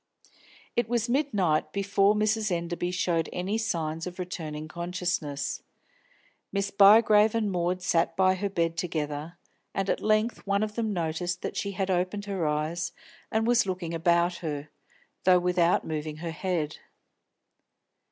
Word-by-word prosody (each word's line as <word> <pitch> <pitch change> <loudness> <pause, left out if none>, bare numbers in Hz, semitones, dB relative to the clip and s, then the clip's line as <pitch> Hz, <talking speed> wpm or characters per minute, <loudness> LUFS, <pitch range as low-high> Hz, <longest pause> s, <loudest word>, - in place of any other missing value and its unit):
It 240 -2 +1
was 235 -1 +1
midnight 210 - +1
and - - -30
before 200 +1 +3
Mrs. 215 0 +1
Enderby 175 0 -2
showed 175 -2 0
any 195 +5 -2
signs 165 -6 -2
of 180 - -7
returning 155 -4 -5
consciousness. 170 -4 -3 0.9
Miss 200 0 -1
Bygrave 210 +2 +6
and 215 -3 +1
Maud 180 0 -1
sat 170 -1 +1
by 185 0 +4
her 200 +2 -2
bed 165 -3 -1
together, 155 -1 -3 0.4
and 195 0 0
at - - -2
length 215 +2 +1
one 200 +1 +2
of 215 -1 -3
them 220 -1 -1
noticed 175 0 -2
that - - -3
she 200 -1 -2
had 190 0 -1
opened 185 +3 -1
her 190 -6 -1
eyes 155 +3 -1 0.4
and 220 0 +1
was 235 -3 +3
looking 180 -3 -3
about 170 +1 +2
her, 150 -3 -5 0.5
though 180 0 +6
without 180 -1 +2
moving 155 -1 -4
her 165 +1 -4
head. 160 -2 -2
180 Hz, 150 wpm, -28 LUFS, 165-200 Hz, 0.9 s, Bygrave